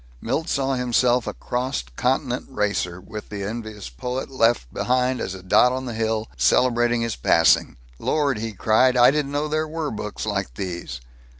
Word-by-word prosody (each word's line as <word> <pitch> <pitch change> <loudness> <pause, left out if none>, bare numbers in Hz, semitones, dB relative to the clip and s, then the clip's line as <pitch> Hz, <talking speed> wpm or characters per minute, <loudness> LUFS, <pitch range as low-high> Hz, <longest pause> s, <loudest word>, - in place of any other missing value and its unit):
Milt 160 - -2
saw 135 -1 0
himself 125 -1 +2
a - - -2
cross 125 - -2
continent - - 0
racer, 100 -4 -1
with 105 +3 -9
the 100 -1 -5
envious 110 -1 -6
poet, 125 - -5
left 115 - +1
behind 125 0 +1
as 95 - -3
a 95 - -11
dot 125 +6 +4
on 130 +1 -3
the 120 - -4
hill, 110 0 -1
celebrating 120 - +3
his 115 -2 -1
passing. 80 +3 +3 0.2
"Lord!" 145 -6 0
he 115 +1 -3
cried. 120 +6 +3
"I 120 +1 +7
didn't 145 -1 -1
know 145 +1 -1
there 155 +1 -1
were 155 -1 -3
books 105 0 -5
like 100 -2 -3
these! 85 -10 -5
120 Hz, 175 wpm, -23 LUFS, 105-130 Hz, 0.2 s, I